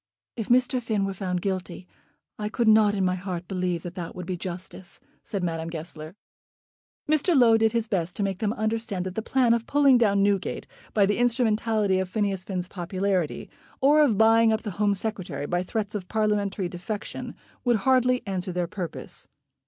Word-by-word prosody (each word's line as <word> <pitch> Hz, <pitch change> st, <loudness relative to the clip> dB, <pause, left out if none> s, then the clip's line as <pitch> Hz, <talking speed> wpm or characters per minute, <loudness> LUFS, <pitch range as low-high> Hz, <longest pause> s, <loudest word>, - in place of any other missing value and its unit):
"If 225 Hz, -3 st, -5 dB
Mr. 250 Hz, +1 st, +3 dB
Finn 215 Hz, -4 st, 0 dB
were 195 Hz, -, -2 dB
found 180 Hz, -2 st, -3 dB
guilty, 185 Hz, -2 st, -3 dB, 0.5 s
I 210 Hz, 0 st, -2 dB
could 235 Hz, +1 st, 0 dB
not 215 Hz, -1 st, +5 dB
in 195 Hz, -2 st, +1 dB
my 185 Hz, -, +2 dB
heart 180 Hz, -1 st, -5 dB
believe 180 Hz, -3 st, -2 dB
that 175 Hz, -, -6 dB
that 175 Hz, -2 st, -6 dB
would 180 Hz, -, -6 dB
be 185 Hz, 0 st, -3 dB
justice," 180 Hz, +1 st, -7 dB, 0.2 s
said 200 Hz, -3 st, -4 dB
Madame 165 Hz, -1 st, -2 dB
Goesler. 160 Hz, 0 st, -7 dB, 0.9 s
Mr. 310 Hz, +2 st, +3 dB
Low 235 Hz, -3 st, +6 dB
did 225 Hz, 0 st, +3 dB
his 230 Hz, -2 st, +1 dB
best 180 Hz, -5 st, -2 dB
to 205 Hz, -, -1 dB
make 195 Hz, -1 st, -2 dB
them 215 Hz, -2 st, 0 dB
understand 220 Hz, -4 st, -2 dB
that 185 Hz, -, -4 dB
the 220 Hz, -, -2 dB
plan 245 Hz, 0 st, +3 dB
of 230 Hz, -1 st, -1 dB
pulling 280 Hz, -3 st, +5 dB
down 200 Hz, -4 st, +3 dB
Newgate 200 Hz, -1 st, 0 dB, 0.3 s
by 205 Hz, -2 st, +5 dB
the 205 Hz, +3 st, 0 dB
instrumentality 225 Hz, -5 st, +2 dB
of 190 Hz, -1 st, -2 dB
Phineas 200 Hz, -2 st, -1 dB
Finn's 185 Hz, -3 st, -4 dB
popularity, 185 Hz, -2 st, -2 dB, 0.3 s
or 295 Hz, +3 st, +5 dB
of 250 Hz, -9 st, +3 dB
buying 225 Hz, +1 st, +5 dB
up 220 Hz, -, 0 dB
the 210 Hz, -, -4 dB
Home 205 Hz, -1 st, +3 dB
Secretary 185 Hz, -9 st, -4 dB
by 175 Hz, +3 st, 0 dB
threats 205 Hz, +2 st, -3 dB
of 195 Hz, -4 st, -4 dB
Parliamentary 205 Hz, -3 st, 0 dB
defection, 185 Hz, +4 st, -6 dB, 0.3 s
would 245 Hz, -2 st, +3 dB
hardly 255 Hz, -2 st, +3 dB
answer 185 Hz, -2 st, -3 dB
their 175 Hz, 0 st, -1 dB
purpose. 175 Hz, -1 st, -7 dB
200 Hz, 185 wpm, -26 LUFS, 180-225 Hz, 0.9 s, Low